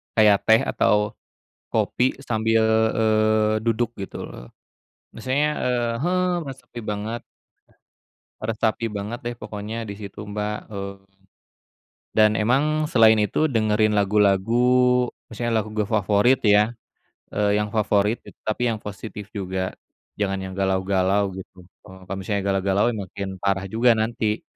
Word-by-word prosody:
Kayak 105 -2 +4
teh 110 0 +6
atau 105 0 +1 0.6
kopi 125 +1 0
sambil, 110 0 +2 0.3
eee, 110 -1 +3
duduk 115 +1 0
gitu 95 - -6
loh. - - -11 0.7
Misalnya, 130 +6 0
e - - +1 0.3
heeh, 180 +2 +1 0.2
meresapi 135 -4 -9
banget 105 +2 -4 1.2
meresapi 110 +1 -1
banget 105 +3 -5
deh, 120 0 -3
pokoknya 105 +1 -6
di 100 - -5
situ, 100 -1 -9
Mbak, 105 0 -2 0.2
eee. 100 -1 -5 1.2
Dan 110 -1 +6
emang, 150 +8 +1
selain 110 -4 +6
itu 105 - -1
dengerin 110 -4 +2
lagu-lagu, 115 +5 +3 0.2
misalnya 120 +1 -2
lagu 110 - -10 0.3
favorit 105 +5 +3
ya, 105 +1 +4 0.6
e - - -11 0.2
yang 105 0 -1
favorit 105 0 +2 0.3
tapi 110 +3 -1
yang 110 - -2
positif 105 0 -8
juga, 95 -2 -3 0.5
jangan 95 -2 0
yang - - -8
galau-galau 95 +1 +1
gitu, 95 -1 -11 0.2
e - - -15 0.2
kalau 95 - -3
misalnya 100 +1 -2
galau-galau 95 +1 +1
makin 100 0 -5
parah 95 0 0
juga 115 +3 +3
nanti, 110 -1 -1
105 Hz, 125 wpm, -23 LUFS, 100-115 Hz, 1.2 s, teh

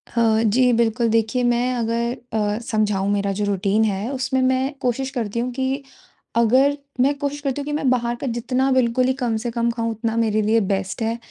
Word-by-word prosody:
हाँ 225 -1 +3
जी, 245 +3 +3
बिल्कुल। 230 0 +2
देखिए 230 +3 +1
मैं 240 +1 +1
अगर 235 +1 -1 0.2
अ, 210 -1 0
समझाऊँ 210 -4 0
मेरा 200 -1 0
जो 205 - +1
रूटीन 200 +2 +1
है 205 +2 -1
उसमें 260 0 0
मैं 260 +2 +1
कोशिश 260 +2 -1
करती 235 -2 -3
हूँ 250 +1 -2
कि 265 +2 -2 0.5
अगर 260 +5 +4 0.2
मैं 280 +3 +4
कोशिश 285 0 -2
करती 280 0 -2
हूँ - - -6
कि 295 - -4
मैं 290 -3 +1
बाहर 240 -1 +1
का 275 - -2
जितना 250 +3 0
बिल्कुल 255 0 +2
ही 260 - +2
कम 230 -2 0
से 240 - -2
कम 235 0 0
खाऊँ 230 0 -2
उतना 225 +1 -3
मेरे 215 -2 +2
लिए 220 +2 +3
बेस्ट 195 +3 -2
है। 225 +1 -1
235 Hz, 205 wpm, -22 LUFS, 220-255 Hz, 0.5 s, अगर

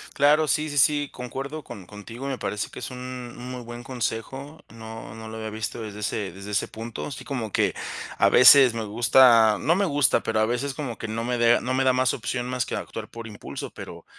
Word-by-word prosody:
Claro, 150 +2 +4
sí 155 0 +1
sí 145 - -4
sí, 145 +1 +3
concuerdo 135 +5 -6
con 100 -7 -10
contigo, 110 +6 -9
me 135 -2 -2
parece 105 -1 -3
que - - -9
es - - -5
un 125 -1 -7
muy 125 0 -7
buen 120 +1 -8
consejo, 135 +4 -5
no 110 -2 -9
no 110 0 -9
lo 110 - -8
había 110 -1 -5
visto 110 +2 -5
desde 105 -1 -7
ese 105 -2 -2
desde 100 +3 -9
ese 105 - 0
punto, 115 +1 -6
así 130 -2 -8
como 120 -7 -4
que - - +1 0.4
a - - +5
veces 130 -1 +8
me 115 -1 -3
gusta 115 0 +5
no 165 +5 +2
me 200 - +1
gusta, 145 -7 +2
pero 110 -1 0
a 110 - +4
veces 125 +4 -2
como 130 -6 -5
que 110 - -6
no 115 +1 -3
me 125 0 -1
dea 120 0 +4
no 130 +1 -2
me 135 0 +2
da 130 - +4
más 125 -1 +2
opción 120 +1 -3
más 125 -1 -1
que - - -4
actuar - - -7
por 115 -1 -8
impulso, 105 -2 -7
pero - - -10
120 Hz, 230 wpm, -25 LUFS, 110-135 Hz, 0.4 s, veces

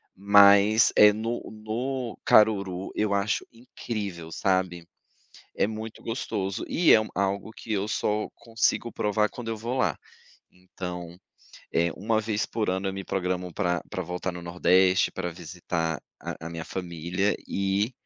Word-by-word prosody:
mas, 100 +2 +6
eh, 105 0 +8
no 115 +3 -3
no 120 +3 -4
Caruru, 100 -4 +3
eu 105 -1 0
acho 100 +1 0
incrível, 105 -8 -6
sabe. 90 -2 0 0.7
É - - +2
muito 110 +1 -7
gostoso 105 -3 -3
e 170 - +4
é - - +9 0.2
algo 100 +2 -1
que 110 - -9
eu 100 0 0
só 105 -1 -1
consigo 115 0 0
provar 105 0 +1
quando 120 -2 -7
eu 110 - -3
vou 120 +4 -3
lá. - - +1 0.5
Então, 90 -1 -8 0.6
eh, 85 +1 +2
uma 110 +2 +1
vez 110 0 -1
por 110 -2 -2
ano 95 +1 -1
eu - - -2
me 95 0 -6
programo 90 -1 -2
para 90 -4 0
para 95 - -3
voltar 90 +1 -4
no 90 - -8
nordeste, 90 +3 +3
para 90 -2 -3
visitar 85 -2 -3
visitar - - -9
a 80 - -7
a - - -6
minha 85 -1 -6
família 90 +3 -2
e 100 +4 0
100 Hz, 155 wpm, -26 LUFS, 90-110 Hz, 0.7 s, é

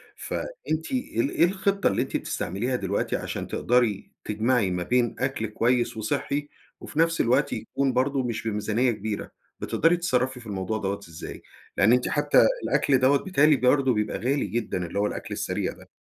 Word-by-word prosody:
فأنتِ 160 - -4
إيه 265 +4 -2
ال 285 - 0
إيه - - +3
الخطّة 195 +2 +1
اللي - - +1
أنتِ - - -1
بتستعمليها 105 +8 -2
دلوقتي 100 -4 -1
عشان - - -4
تقدري 120 -5 +1
تجمعي 110 -1 +1
ما 90 0 -1
بين 120 +4 +1
أكل 135 -4 -1
كويس 120 +2 +1
وصحّي، 140 +7 -2 0.3
وفي 155 - -6
نفس 165 0 +3
الوقت 130 +5 +2
يكون 135 -1 -1
برضه 130 +2 +1
مش 115 -2 -3
بميزانية 110 +4 +1
كبيرة، 105 -1 -4 0.3
بتقدري 165 +2 +2
تتصرّفي 130 -6 0
في 115 - -12
الموضوع 100 +1 -2
دوَّة 100 -1 -2
إزاي؟ 80 - -8 0.4
لأن 105 +4 +5
أنتِ 125 0 +2
حتى - - +4 0.2
الأكل 135 - +2
دوَّة 135 +2 +4
بيتهيألي 155 -5 +4
برضه 130 0 +3
بيبقى 105 -1 -1
غالي 135 +5 0
جدًا، 100 -3 -2
اللي 100 +4 -3
هو 105 - +2
الأكل - - -5
السريع - - -2
ده. - - -17
125 Hz, 170 wpm, -26 LUFS, 105-140 Hz, 0.4 s, لأن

